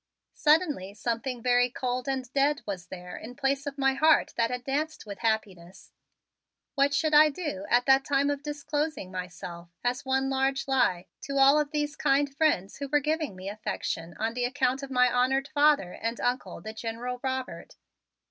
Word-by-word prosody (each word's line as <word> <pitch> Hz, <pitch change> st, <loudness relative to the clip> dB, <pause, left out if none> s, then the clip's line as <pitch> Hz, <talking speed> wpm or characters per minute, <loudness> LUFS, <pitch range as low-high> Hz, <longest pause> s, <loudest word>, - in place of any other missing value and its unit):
Suddenly 295 Hz, -, +2 dB
something 235 Hz, +2 st, -3 dB
very 245 Hz, 0 st, +3 dB
cold 250 Hz, +1 st, -3 dB
and 260 Hz, -1 st, -2 dB
dead 280 Hz, +1 st, +2 dB
was 190 Hz, -4 st, -5 dB
there 180 Hz, -1 st, -8 dB
in 245 Hz, +3 st, -9 dB
place 275 Hz, +1 st, -1 dB
of 285 Hz, 0 st, -5 dB
my 270 Hz, -1 st, +3 dB
heart 310 Hz, +4 st, +3 dB
that 230 Hz, -1 st, +1 dB
had 250 Hz, 0 st, -4 dB
danced 295 Hz, +3 st, -2 dB
with 200 Hz, -2 st, -8 dB
happiness. 195 Hz, -5 st, -3 dB, 0.8 s
What 280 Hz, 0 st, +3 dB
should 310 Hz, +1 st, +1 dB
I 305 Hz, +1 st, +8 dB
do 280 Hz, -, -5 dB
at 245 Hz, +1 st, +3 dB
that 270 Hz, 0 st, +5 dB
time 280 Hz, 0 st, +1 dB
of 285 Hz, -1 st, -3 dB
disclosing 295 Hz, -6 st, -3 dB
myself 175 Hz, -1 st, -7 dB
as 250 Hz, +3 st, -1 dB
one 265 Hz, 0 st, +1 dB
large 270 Hz, 0 st, 0 dB
lie 190 Hz, -10 st, +2 dB, 0.2 s
to 275 Hz, 0 st, -3 dB
all 275 Hz, +2 st, +6 dB
of 300 Hz, -1 st, 0 dB
these 295 Hz, -1 st, -2 dB
kind 275 Hz, 0 st, +1 dB
friends 275 Hz, -, +1 dB
who 280 Hz, -, -4 dB
were 295 Hz, +2 st, +3 dB
giving 305 Hz, -, -1 dB
me 185 Hz, +1 st, -8 dB
affection 200 Hz, -5 st, -4 dB
on 225 Hz, +1 st, -1 dB
the 245 Hz, 0 st, -1 dB
account 260 Hz, +1 st, 0 dB
of 275 Hz, -, -7 dB
my 250 Hz, -1 st, +4 dB
honored 260 Hz, +3 st, +1 dB
father 290 Hz, -11 st, +3 dB
and 230 Hz, +1 st, -4 dB
Uncle, 245 Hz, +2 st, -2 dB
the 220 Hz, -, -7 dB
General 235 Hz, +3 st, -5 dB
Robert? 260 Hz, -1 st, -4 dB
265 Hz, 180 wpm, -28 LUFS, 225-285 Hz, 0.8 s, I